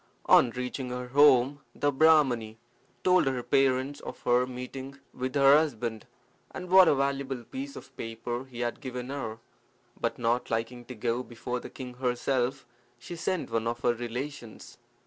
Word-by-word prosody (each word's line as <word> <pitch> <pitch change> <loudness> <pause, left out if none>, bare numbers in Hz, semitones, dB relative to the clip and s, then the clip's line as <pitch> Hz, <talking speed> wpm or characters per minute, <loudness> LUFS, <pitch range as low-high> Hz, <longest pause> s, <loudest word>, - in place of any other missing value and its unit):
On 125 - +6
reaching 125 +1 -4
her 125 0 -5
home 140 0 +5 0.2
the 145 - +1
Brahmani 135 -7 +3 0.5
told 180 -5 +4
her 130 -2 -1
parents 135 +2 +1
of - - -8
her 125 +1 +3
meeting 130 +2 -7 0.2
with 130 +1 -4
her 140 0 +7
husband, 120 -8 -1 0.4
and 180 0 -8
what 190 -1 +8
a - - +5
valuable 135 -2 -1
piece 275 - -7
of - - -12
paper 120 +2 -5
he 125 -2 -8
had 120 -1 -3
given 125 -1 -5
her; 115 -6 -4 0.6
but - - -1
not 120 +2 0
liking 120 +2 -3
to 125 - -8
go 115 +2 -1
before 125 +1 -5
the - - -9
king 125 -2 -8
herself, 125 +1 -1 0.3
she 145 +8 -8
sent 175 -4 -2
one 115 0 0
of 120 +1 -3
her 120 - +3
relations. 120 +1 -7
125 Hz, 165 wpm, -28 LUFS, 120-140 Hz, 0.6 s, what